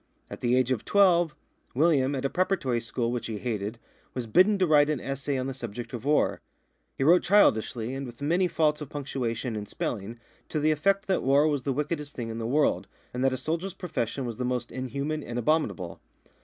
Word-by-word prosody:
At - - -7
the 120 0 +2
age 130 0 +2
of 125 - 0
twelve, 175 -5 +4 0.4
William, 140 -2 +3
at 135 0 -3
a - - +2
preparatory 175 -10 0
school 115 +1 -2
which 120 -1 -3
he 110 -2 -4
hated, 110 -1 -3 0.4
was 125 -2 -2
bidden 185 - +4
to 190 - +3
write 150 -2 +5
an 150 -3 0
essay 135 +1 -3
on 130 - -2
the 135 - -3
subject 120 -1 -7
of 120 +1 -6
war. 150 +1 +2 0.6
He - - 0
wrote 175 +5 +6
childishly, 120 - +3
and 135 0 -4
with 120 -1 -11
many 170 +6 +2
faults 155 -3 +1
of 145 - -6
punctuation 125 -5 -3
and 105 -1 -5
spelling, 115 +1 -4 0.3
to 155 - -1
the 155 +1 +3
effect 195 +7 +1
that 190 -2 +1
war 140 +3 +4
was 145 -3 0
the 140 - -1
wickedest 150 +1 -3
thing 115 -2 -4
in 115 0 -5
the 115 - -3
world, 125 -8 +1 0.3
and 125 +1 -2
that 135 - +4
a 130 - -2
soldier's 170 +7 -3
profession 135 - -3
was 115 -2 -5
the 125 - -2
most 125 -1 -2
inhuman 140 +4 -3
and 120 -3 -6
abominable. 120 - 0
135 Hz, 210 wpm, -27 LUFS, 120-155 Hz, 0.6 s, wrote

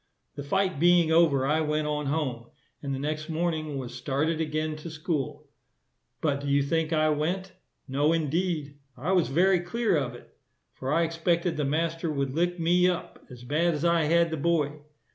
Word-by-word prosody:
The 145 - -6
fight 185 +2 0
being 175 -1 +4
over, 160 -5 +4
I 155 +3 +2
went 150 0 0
on 150 -1 -2
home, 135 -6 -2 0.3
and 140 - -4
the 135 - -1
next 155 +3 -3
morning 160 -3 -2
was 130 -3 -6
started 155 +4 -1
again 155 0 -2
to 155 +2 -8
school; 155 -3 -3 0.7
but 140 -3 0
do 145 - -5
you 140 0 +3
think 160 +2 0
I 155 -1 +3
went? 175 +6 -1 0.4
No, 145 +4 +2
indeed. 160 -2 -1 0.2
I 150 +9 -2
was 180 -3 +3
very 180 +6 +3
clear 205 +3 0
of 135 -5 -1
it; - - -16 0.4
for 135 +1 -4
I 165 +2 +3
expected 170 +1 0
the 150 - -1
master 165 +3 -1
would 140 -3 -2
lick 175 +3 0
me 175 +2 +4
up, 180 - -5
as 125 -1 -11
bad 160 +6 +1
as 150 +3 -2
I 170 -2 +3
had 170 +1 +3
the 160 - -2
boy. 150 -1 0
155 Hz, 185 wpm, -27 LUFS, 145-170 Hz, 0.7 s, being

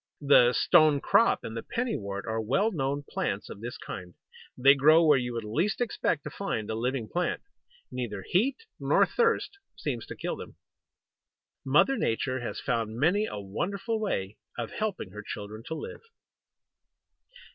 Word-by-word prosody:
The 135 -4 +6
Stone 155 -3 +5
crop 230 - +3
and 110 - -6
the 115 - -3
Penny 240 - -2
wort 100 -1 -5
are 110 0 -1
well 195 - +1
known 140 -4 -2
plants - - -3
of 100 - -9
this 120 +1 -6
kind. 90 -2 -8 0.4
They 135 +2 +7
grow 155 +4 +5
where 150 -4 +6
you 125 0 -3
would 115 -1 -3
least 155 - 0
expect 225 - 0
to 150 - -6
find 110 - -3
a - - -1
living 120 +1 -2
plant. 180 +6 -1 0.5
Neither 110 -6 -4
heat 230 +10 +2 0.2
nor - - +4
thirst 455 -4 0 0.2
seems - - -4
to - - -7
kill - - -4
them. - - -10 1.1
Mother 270 0 +4
Nature 130 +3 0
has 120 - -5
found 115 -4 -2
many 190 +9 +3
a 105 - -5
wonderful 195 - -3
way 105 - -2 0.2
of 120 -2 -4
helping 205 - -3
her 105 +2 -7
children 105 +1 -7
to 160 - -3
live. 155 - -7
135 Hz, 165 wpm, -28 LUFS, 110-180 Hz, 1.1 s, They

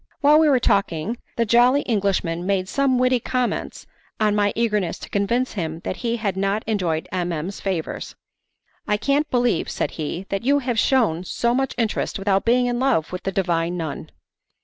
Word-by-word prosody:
While 295 +2 +6
we 315 -1 +4
were 265 -3 +4
talking, 200 -1 0 0.2
the 230 - +1
jolly 245 +5 +4
Englishman 195 -6 0
made 190 -1 0
some 270 +4 +1
witty 255 0 +3
comments 250 +1 -2 0.3
on 215 -1 +2
my 205 -1 +2
eagerness 210 -5 0
to - - -10
convince 235 +6 0
him 165 -4 -4
that 185 - -4
he 235 -1 -1
had 205 -4 -2
not 195 +2 0
enjoyed 180 -7 -1
M. 180 -1 -1
M.'s 170 +5 -4
favours. 185 -5 -3 0.7
"I 210 - +2
can't 285 +6 +1
believe," 245 -8 +1
said - - -2
he, 165 +4 -4
"that 195 - -2
you 280 +3 +3
have 245 -4 -1
shewn 220 -11 +2
so 235 +6 0
much 270 +1 -1
interest 225 -3 -1
without 195 0 +1
being 245 +2 +3
in 245 0 -1
love 250 - +1
with 180 - -5
the 195 - -2
divine 175 -2 0
nun." 160 -4 -5
210 Hz, 185 wpm, -22 LUFS, 185-245 Hz, 0.7 s, While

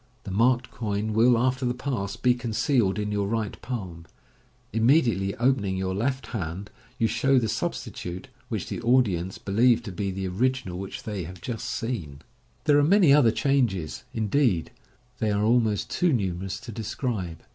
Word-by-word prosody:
The 100 - -6
marked 120 +4 +2
coin 105 -1 -2
will, 120 +2 +5
after 130 +2 +1
the 125 0 0
pass, 125 -6 -3
be 125 -1 +3
concealed 120 -3 +1
in 105 0 -2
your 100 -1 0
right 110 -1 -3
palm. 90 -9 -6 0.7
Immediately 115 -5 +3
opening 115 -7 +1
your 95 0 -1
left 130 +7 -1
hand, 95 0 -4 0.3
you 115 - +2
show 130 +4 +2
the 115 -3 +2
substitute, 90 -3 -4 0.2
which - - -3
the - - -4
audience 100 -8 +2
leheve 115 +4 +3
to 105 - -6
be 100 +2 -3
the 95 0 -3
original 95 -2 -1
which 95 0 -6
they 100 -5 -4
have 90 +2 -9
just 115 +2 -5
seen, - - -3
c58 125 - 0
MODERN 75 - -11
MAGIC. 70 - -18 0.4
There 145 -2 +5
are - - +4
many 175 -2 +5
other 135 -6 +6
changes; 115 - 0
indeed, 110 - +1 0.5
they 110 - +1
are 105 0 +1
almost 110 -3 +2
too 175 -1 +2
numerous 95 -4 -2
to 120 - -8
describe. 105 - -4
110 Hz, 175 wpm, -26 LUFS, 95-125 Hz, 0.7 s, other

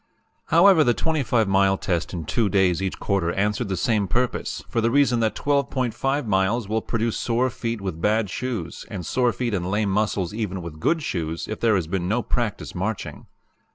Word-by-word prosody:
"However, 170 -1 +6
the 120 -4 +2
25 130 -9 +1
mile 95 0 +3
test 85 -3 -2
in 85 -3 -5
two 110 +6 +1
days 95 -2 +2
each 95 -1 -3
quarter 95 -4 0
answered 105 +3 0
the 95 - -1
same 105 +1 +1
purpose, 125 +6 -1
for 115 - -1
the 115 - +2
reason 130 -2 +3
that 110 -1 +1
12.5 140 -1 0
miles 100 +2 +1
will 110 +2 0
produce 115 0 -1
sore 120 +2 +1
feet 115 -3 -4
with 90 -4 -4
bad 105 +2 +2
shoes, 110 -3 -4
and 95 -6 -5
sore 125 +4 +2
feet 120 -1 -3
and 90 -2 -1
lame 105 0 0
muscles 100 -2 0
even 100 -5 -3
with 80 -2 -8
good 160 - +1
shoes, 80 - -3
if 110 - -5
there 115 -2 +3
has 90 -4 0
been 90 +1 -2
no 110 +5 0
practice 115 -4 -2
marching. 100 +4 -4
110 Hz, 190 wpm, -24 LUFS, 95-120 Hz, -, However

